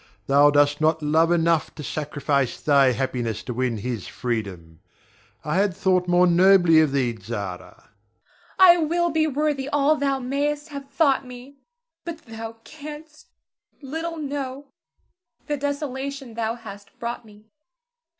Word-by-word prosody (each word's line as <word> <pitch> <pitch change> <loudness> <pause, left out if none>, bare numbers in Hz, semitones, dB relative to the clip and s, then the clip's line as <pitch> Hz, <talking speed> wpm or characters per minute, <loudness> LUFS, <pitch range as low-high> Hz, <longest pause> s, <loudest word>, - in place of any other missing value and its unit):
Thou 145 +2 +5
dost 145 0 +2
not 155 0 +2
love 160 +3 +3
enough 165 -2 +1
to 150 - -8
sacrifice 145 -2 -2
thy 140 -3 +4
happiness 120 -4 -3
to 125 - -5
win 125 -1 -1
his 115 -1 -5
freedom. 95 -10 -5 0.7
I - - -1
had 195 -2 +1
thought 185 -2 +1
more 175 +1 +4
nobly 175 -2 +5
of 155 -3 +3
thee, 130 -3 +1
Zara. 100 -3 -5
Zara. - - -19 0.7
I 360 -2 +8
will 345 +1 0
be 315 0 +1
worthy 290 -1 -1
all 290 +1 +3
thou 275 -1 0
mayst 290 +4 -2
have 280 -2 -8
thought 275 -1 +2
me; 250 +3 -12 0.4
but 340 -1 -6
thou 225 0 -7
canst 305 0 -11 0.6
little 325 +4 -5
know 280 -2 -5 0.8
the 295 - -1
desolation 280 -2 -4
thou 225 0 -2
hast 205 -4 -12
brought 235 0 -5
me. 215 0 -19
220 Hz, 140 wpm, -23 LUFS, -, 0.8 s, I